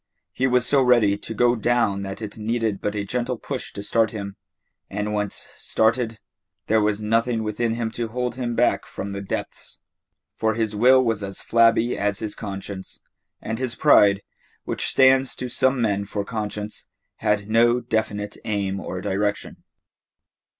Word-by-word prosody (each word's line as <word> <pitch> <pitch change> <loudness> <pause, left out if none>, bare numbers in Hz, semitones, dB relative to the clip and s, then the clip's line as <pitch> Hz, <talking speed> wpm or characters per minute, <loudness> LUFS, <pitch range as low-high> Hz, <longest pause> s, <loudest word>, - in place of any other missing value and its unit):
He 130 - +1
was 125 -1 +2
so 140 +1 +4
ready 120 -6 +4
to 110 +2 -7
go 120 +2 +3
down 115 -3 +1
that 95 +3 -6
it 105 - -6
needed 110 -2 -1
but 105 0 -2
a 100 -1 -2
gentle 125 +3 -2
push 130 +2 -5
to 100 - -6
start 110 +1 +2
him, 100 -2 -6 0.5
and 105 +1 -3
once 105 -1 -2
started, 115 0 0 0.5
there 110 0 +3
was 105 0 +1
nothing 115 +1 +1
within 110 +2 -1
him 115 -1 -2
to 120 0 -3
hold 125 +1 -2
him 120 -1 -3
back 120 - +2
from 100 - -6
the 100 0 -4
depths. 95 - -6 0.6
For 110 -1 0
his 110 -2 -1
will 130 +4 +5
was 115 -3 0
as 100 -1 -5
flabby 115 +1 +3
as 100 -1 0
his 110 -1 -3
conscience, 100 -2 -7 0.4
and 110 +1 -3
his 130 -3 -1
pride, 100 0 +5 0.4
which - - -1
stands 130 0 +4
to 125 - -5
some 130 +2 +2
men 100 -3 0
for 100 0 -4
conscience, 105 -1 -5 0.3
had 105 -1 0
no 120 +2 +4
definite 105 -3 -2
aim 100 -3 -2
or 95 -1 -5
direction. 100 +2 -2
110 Hz, 165 wpm, -23 LUFS, 105-120 Hz, 0.6 s, will